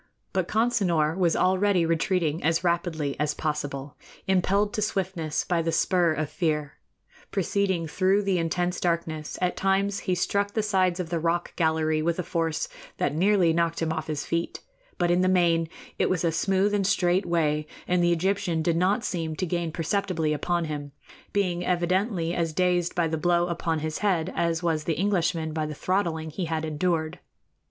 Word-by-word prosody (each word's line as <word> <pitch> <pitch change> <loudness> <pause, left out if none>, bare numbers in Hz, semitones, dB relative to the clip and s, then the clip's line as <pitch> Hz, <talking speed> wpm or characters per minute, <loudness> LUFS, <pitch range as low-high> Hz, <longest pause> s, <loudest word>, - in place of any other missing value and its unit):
But 185 -3 0
Consinor 195 -9 +1
was 180 -3 +2
already 185 -1 +3
retreating 165 -1 0
as 165 +2 +1
rapidly 170 -5 0
as 150 0 0
possible, 145 -2 -4 0.3
impelled 195 +3 +2
to 215 - -1
swiftness 185 -6 -1
by 175 -2 0
the 165 0 -1
spur 175 0 +2
of 155 -1 -3
fear. 150 -3 -1 0.6
Proceeding 190 -2 0
through 190 +5 +2
the 195 -3 +1
intense 175 +2 -1
darkness, 165 -3 -2
at 180 - +1
times 195 +1 +1
he 185 -2 -1
struck 200 +3 0
the 220 - 0
sides 185 -3 +1
of 175 -2 -4
the 170 - 0
rocky 170 +1 0
gallery 160 -1 +1
with 165 +1 0
a 180 - -1
force 165 -2 -1 0.3
that 145 - 0
nearly 180 0 +3
knocked 170 0 0
him 160 -1 0
off 160 -1 -4
his 150 -2 -3
feet; 170 0 -2 0.4
but 175 -2 +2
in 175 +1 +3
the 185 - +3
main 170 -3 +3 0.3
it - - +2
was 180 -2 0
a 165 - +2
smooth 195 +4 +1
and 200 -2 +1
straight 185 -1 +2
way, 155 -3 +1 0.2
and 180 0 +2
the 175 - +3
Egyptian 175 -2 0
did 165 0 +1
not 195 +6 +2
seem 160 -3 -2
to 185 - -2
gain 170 -1 -2
perceptibly 165 -2 -1
upon 170 +3 -1
him, 145 -2 -5 0.4
being 180 -3 0
evidently 180 0 0
as 165 -2 -1
dazed 180 0 +1
by 170 -2 +2
the 160 0 -2
blow 175 +1 +2
upon 170 -1 -1
his 155 0 -3
head 185 -4 0
as 170 0 0
was 160 -3 0
the 165 - -1
Englishman 175 -5 0
by 155 -1 -1
the 150 - -6
throttling 165 -3 -1
he 180 +3 -3
had 160 -1 -2
endured. 160 +1 -1
170 Hz, 180 wpm, -26 LUFS, 160-185 Hz, 0.6 s, already